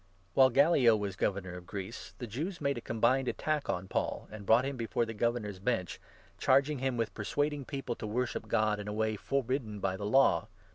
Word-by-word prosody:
While 130 +5 +6
Gallio 135 -3 +5
was 100 -2 -3
governor 95 -1 -1
of 90 -1 -9
Greece, 100 +4 -7
the 125 - -5
Jews 155 - -4
made 140 -1 0
a 120 - -5
12 - - -35
combined 120 +4 +2
attack 155 +2 -1
on 90 +1 -2
Paul, - - -2
and 105 -2 -9
brought 120 +3 +5
him 140 0 -2
before 115 -1 -1
the 115 - -6
Gover 120 +2 +1
nor's 105 -4 -7
Bench, 100 -4 -2 0.4
charging 140 +2 +3
him 130 -1 -1
with 115 -2 -1
persuading 145 +6 -1
people 135 -3 -4
to 110 - -5
worship 120 +3 -1
13 - - -18
God 110 -1 +2
in 105 - -6
a 105 - -3
way 110 0 0
forbidden 130 -2 -2
by 95 -1 -1
the 100 - -5
Law. 110 -9 +4
115 Hz, 220 wpm, -31 LUFS, 105-135 Hz, 0.4 s, While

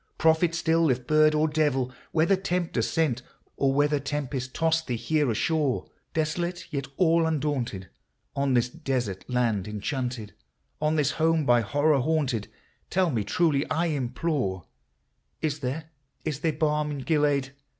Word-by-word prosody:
— - - -44
prophet 160 +1 +3
still, 165 -1 +2
if 125 -1 0
bird 155 +1 +4
or 155 +1 +3
devil! 145 -5 +1 0.2
Whether 165 +4 +3
tempter 180 -8 -1
sent, 125 -1 0 0.3
or 135 -1 +2
whether 145 +1 +2
tempest 135 -2 -4
tossed 165 0 +1
thee 125 - -1
here 145 +4 +1
ashore, 145 +3 0 0.3
Desolate 170 +3 -1
yet 140 -3 -3
all 165 -2 +4
undaunted, 135 -11 -2 0.5
on 140 -2 +1
this 120 0 +3
desert 120 -7 -3
land 115 -6 0
enchanted, 115 +1 -3 0.2
— - - -46
On 155 +1 +2
this 150 -3 +2
home 160 -1 +2
by 120 -1 +5
horror 145 +6 +2
haunted, 140 -7 0 0.2
— - - -40
tell 185 -2 +2
me 115 -5 0
truly, 145 - +2
I 170 +2 +1
implore, 125 - -1 0.4
— - - -47
Is 150 -1 0
there 150 +4 -4 0.2
— - - -41
is 150 -3 -2
there 160 0 0
balm 150 0 0
in 145 -2 -4
Gilead 145 -3 +1
145 Hz, 160 wpm, -27 LUFS, 125-160 Hz, 0.5 s, by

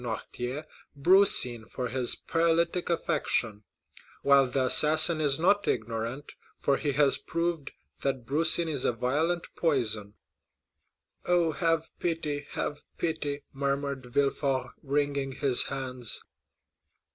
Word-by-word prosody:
Noirtier 125 +4 -5 0.3
brucine 140 - +4
for 125 -2 -4
his 125 0 +3
paralytic 170 +2 0
affection, 110 - 0 0.6
while 140 -1 +5
the 130 0 0
assassin 155 +4 +5
is 140 -3 +1
not 205 +4 +2
ignorant, 115 +5 -3 0.3
for 140 - 0
he 145 -2 -2
has 140 0 +3
proved 170 -3 -3 0.3
that 135 -3 -2
brucine 160 +5 +2
is 145 -5 -2
a - - +1
violent 155 +9 -1
poison." 110 -10 -1 1.1
"Oh, 175 -2 +2
have 165 0 -1
pity—have 150 -3 -3 0.2
pity!" 150 -4 -3
murmured 140 -1 -3
Villefort, 135 +1 -1
wringing 140 -1 -2
his 135 -2 +3
hands. 130 -4 -3
140 Hz, 110 wpm, -28 LUFS, 130-160 Hz, 1.1 s, while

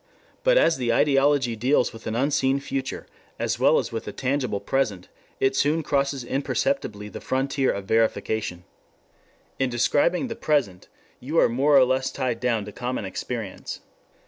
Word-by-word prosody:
But - - +4
as 165 - +4
the 120 -2 0
ideology 135 -1 +3
deals 125 +3 +1
with 115 - -10
an 110 - -2
unseen 135 +1 +1
future, 135 -1 -4 0.3
as - - -2
well - - +5
as - - -1
with - - -5
a - - -3
tangible 130 -5 -1
present, 110 -10 -1 0.3
it 135 0 +2
soon 155 +4 +2
crosses 140 -2 0
imperceptibly 135 - -2
the - - -9
frontier 135 +1 0
of 100 -1 -5
verification. 110 -4 0 1.0
In 135 -1 +1
describing 145 - +1
the 235 - -5
present 130 -12 0 0.3
you 150 +6 -3
are - - +5
more 140 +5 +4
or 130 - +7
less 130 +1 0
tied 125 -4 -2
down 115 -4 0
to 105 - -8
common 125 -1 -4
experience. 105 +1 -5
130 Hz, 160 wpm, -24 LUFS, 115-140 Hz, 1.0 s, or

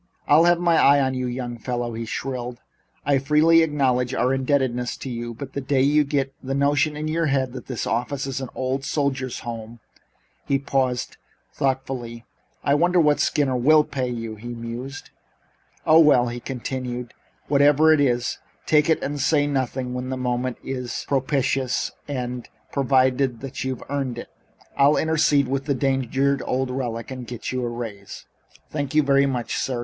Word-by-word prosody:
"I'll 155 +3 +6
have 175 0 +4
my 170 -2 +3
eye 140 -1 +6
on 130 -1 +1
you, 130 -1 -2
young 120 -1 -4
feller," 120 -1 -3
he 115 0 -4
shrilled. 125 0 -4 0.5
"I 140 -1 +3
freely 155 +4 +5
acknowledge 130 -5 +1
our 125 +2 +2
indebtedness 130 -2 0
to 130 - -6
you, 120 0 -5
but 135 +2 -8
the 140 - -3
day 130 0 +1
you 150 +2 +4
get 140 -1 -1
the 135 0 -3
notion 145 +2 +2
in 155 +1 -3
your 165 +1 0
head 135 -3 0
that 130 - -8
this 125 -4 -3
office 125 +4 -2
is 135 -1 -3
an 130 - -5
old 130 +1 -2
soldiers' 135 -3 -2
home 115 0 -7 0.3
" - - -41
He 140 - +2
paused 130 -2 -1 0.4
thoughtfully. 130 -3 -3 0.4
"I 140 - +2
wonder 175 +4 +3
what 150 -3 +3
Skinner 140 -3 +1
will 150 +5 +5
pay 130 -4 -3
you?" 115 -2 -4
he 110 +3 -10
mused. 120 +4 -7 0.7
"Oh, 160 +1 +7
well," 125 -6 +5
he 120 +1 -5
continued, 125 -1 -5 0.3
whatever 145 +2 +5
it 150 - +3
is, 120 -3 0 0.3
take 150 +1 +3
it 160 - +2
and 145 0 -3
say 145 +1 +3
nothing 130 -2 -1
and 125 - -5
when 125 0 -4
the 130 - -3
moment 125 0 -2
is 125 -2 -4
propitious 135 -1 0 0.2
and 125 -3 -4 0.2
provided 130 -1 +1
you've 130 -2 -4
earned 135 -4 -2
it 120 - -7 0.5
I'll 140 +2 +4
intercede 150 -3 +2
with 135 +1 -2
the 140 -2 0
danged 135 -1 -1 0.3
old 130 0 -1
relic 120 -2 -4
and 130 -2 -7
get 120 -1 -5
you 130 -1 -2
a 120 - -1
raise." 110 -4 -7 0.5
"Thank 145 -1 -3
you 155 - +5
very 140 0 +3
much, 125 -3 -2
sir. 130 -2 -2
130 Hz, 175 wpm, -23 LUFS, 125-140 Hz, 0.7 s, Oh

